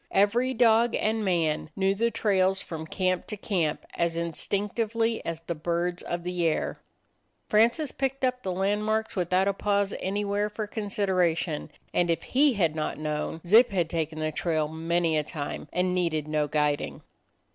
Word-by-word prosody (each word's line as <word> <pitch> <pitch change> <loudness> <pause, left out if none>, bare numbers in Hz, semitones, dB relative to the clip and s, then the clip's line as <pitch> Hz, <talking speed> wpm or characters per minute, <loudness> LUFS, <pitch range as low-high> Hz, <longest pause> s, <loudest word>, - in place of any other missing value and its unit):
Every 235 +6 +2
dog 230 0 +4
and 220 +1 0
man 165 -5 0
knew 195 0 +2
the 230 +4 +1
trails 195 -4 +2
from 160 -3 -6
camp 185 0 -1
to 210 - -4
camp 175 -7 -1
as 170 -1 0
instinc 190 +5 -2
tively 230 0 0
as 165 -1 -4
the 170 +1 -3
birds 170 +2 -1
of 175 0 -4
the 180 0 -2
air. 160 -2 0 0.7
Francis 235 +7 +3
picked 270 0 -1
up 250 0 -1
the 190 - -3
landmarks 210 +4 0
without 185 +1 +2
a 200 - +2
pause 200 0 0
anywhere 205 +2 -1
for 210 +1 -4
consideration, 190 -7 0 0.2
and 175 -1 +2
if 165 - 0
he 280 +1 +3
had 165 -7 +1
not 155 -1 -2
known, 150 +1 -3
Zip 225 +7 +6
had 175 -6 -1
taken 160 -2 -2
the 155 0 -1
trail 155 -1 0
many 165 0 0
a - - -1
time 150 -1 -5
and 180 0 +1
needed 165 -4 0
no 155 -1 0
guiding. 150 0 -1
185 Hz, 170 wpm, -27 LUFS, 165-210 Hz, 0.7 s, Zip